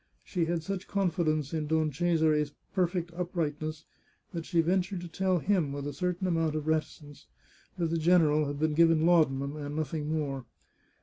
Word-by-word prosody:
She 175 Hz, -3 st, -1 dB
had 165 Hz, -1 st, -1 dB
such 190 Hz, +2 st, -4 dB
confidence 165 Hz, -7 st, 0 dB
in 155 Hz, -2 st, -1 dB
Don 155 Hz, 0 st, +1 dB
Cesare's 155 Hz, -2 st, +1 dB, 0.2 s
perfect 175 Hz, -2 st, 0 dB
uprightness 155 Hz, -3 st, -3 dB, 0.5 s
that 165 Hz, -2 st, -5 dB
she 170 Hz, -, +1 dB
ventured 180 Hz, +2 st, +1 dB
to 175 Hz, -, -6 dB
tell 185 Hz, +2 st, 0 dB
him, 175 Hz, -4 st, +1 dB
with 140 Hz, 0 st, -4 dB
a 145 Hz, -, -4 dB
certain 180 Hz, +3 st, -2 dB
amount 165 Hz, -3 st, +1 dB
of 155 Hz, -1 st, -2 dB
reticence, 155 Hz, -2 st, -3 dB, 0.5 s
that 170 Hz, -2 st, 0 dB
the 165 Hz, -, 0 dB
general 155 Hz, -3 st, +4 dB
had 145 Hz, 0 st, -4 dB
been 155 Hz, 0 st, +1 dB
given 165 Hz, 0 st, +4 dB
laudanum, 145 Hz, -5 st, +3 dB
and 145 Hz, 0 st, -5 dB
nothing 155 Hz, 0 st, -2 dB
more. 140 Hz, -5 st, -2 dB
160 Hz, 170 wpm, -29 LUFS, 150-175 Hz, 0.5 s, general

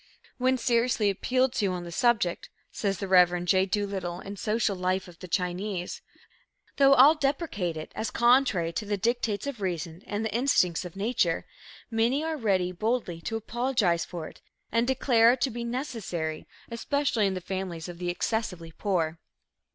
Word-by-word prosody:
"When 260 Hz, +1 st, +2 dB
seriously 235 Hz, -3 st, +2 dB
appealed 255 Hz, +6 st, +1 dB
to 205 Hz, -, +1 dB
on 180 Hz, -2 st, -3 dB
the 170 Hz, -, -8 dB
subject," 200 Hz, -3 st, +1 dB, 0.2 s
says 195 Hz, -2 st, -1 dB
the 195 Hz, -, -4 dB
Rev. 180 Hz, -1 st, +4 dB
J. 190 Hz, +1 st, +3 dB
Doolittle 190 Hz, -3 st, -2 dB
in 200 Hz, +2 st, -7 dB
Social 215 Hz, 0 st, 0 dB
Life 185 Hz, +1 st, -1 dB
of 175 Hz, -1 st, -14 dB
the 185 Hz, -, -8 dB
Chinese, 180 Hz, +1 st, -2 dB, 0.8 s
"though 275 Hz, 0 st, +6 dB
all 275 Hz, +5 st, +8 dB
deprecate 275 Hz, -, -1 dB
it 155 Hz, -, -7 dB
as 220 Hz, -, -2 dB
contrary 235 Hz, -9 st, +3 dB
to 210 Hz, -, -3 dB
the 205 Hz, 0 st, 0 dB
dictates 225 Hz, 0 st, -1 dB
of 275 Hz, -7 st, -5 dB
reason 170 Hz, -2 st, -3 dB
and 205 Hz, +2 st, -2 dB
the 220 Hz, -, -3 dB
instincts 205 Hz, -9 st, +2 dB
of 180 Hz, -, -8 dB
nature, 195 Hz, -5 st, 0 dB, 0.5 s
many 235 Hz, +6 st, +1 dB
are 320 Hz, 0 st, -1 dB
ready 195 Hz, -9 st, +1 dB
boldly 200 Hz, -3 st, -2 dB
to 225 Hz, -, -3 dB
apologize 225 Hz, -6 st, 0 dB
for 165 Hz, -3 st, -6 dB
it -, -, -15 dB, 0.3 s
and 230 Hz, +1 st, +2 dB
declare 245 Hz, -3 st, +4 dB
it 255 Hz, -, -5 dB
to 265 Hz, -, +1 dB
be 235 Hz, +1 st, -5 dB
necessary, 225 Hz, -, -4 dB, 0.2 s
especially 235 Hz, -2 st, 0 dB
in 190 Hz, -, -1 dB
the -, -, -2 dB
families 180 Hz, -3 st, -5 dB
of 175 Hz, -1 st, -9 dB
the 175 Hz, -1 st, -2 dB
excessively 180 Hz, -3 st, -2 dB
poor." 165 Hz, -4 st, -1 dB
205 Hz, 170 wpm, -27 LUFS, 180-240 Hz, 0.8 s, all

